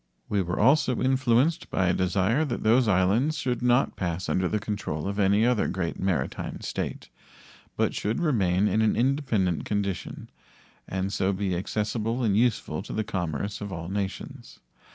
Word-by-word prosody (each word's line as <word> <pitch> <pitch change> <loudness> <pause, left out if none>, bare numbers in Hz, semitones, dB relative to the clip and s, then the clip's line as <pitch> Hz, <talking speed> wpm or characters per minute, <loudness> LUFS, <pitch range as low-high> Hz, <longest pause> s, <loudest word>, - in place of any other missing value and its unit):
We 100 -1 +1
were 90 -1 -3
also 130 +1 +3
influenced 130 +4 +2
by 95 - +1
a 90 - +2
desire 95 - +1
that 125 -5 -3
those 115 +2 +4
islands 105 - +2
should 125 -2 -2
not 125 +2 +2
pass 90 -1 -3
under 95 0 +1
the 105 - 0
control 100 -6 -4
of 100 +1 -3
any 100 +3 +4
other 120 -4 +2
great 85 -2 -3
maritime 90 -9 -2
state, - - -4 0.7
but - - +1
should 105 +3 -2
remain 105 - +2
in 110 - +1
an 110 - +2
independent 120 - +1
condition, 100 -3 -3 0.6
and 95 +1 -2
so 95 +1 +1
be 95 -1 -1
accessible 110 +6 -2
and 105 -4 +2
useful 110 -8 +1
to - - -8
the 110 - -1
commerce 95 0 -3
of 100 -1 -5
all 85 -1 -5
nations. 100 -1 -5
105 Hz, 165 wpm, -26 LUFS, 95-120 Hz, 0.7 s, those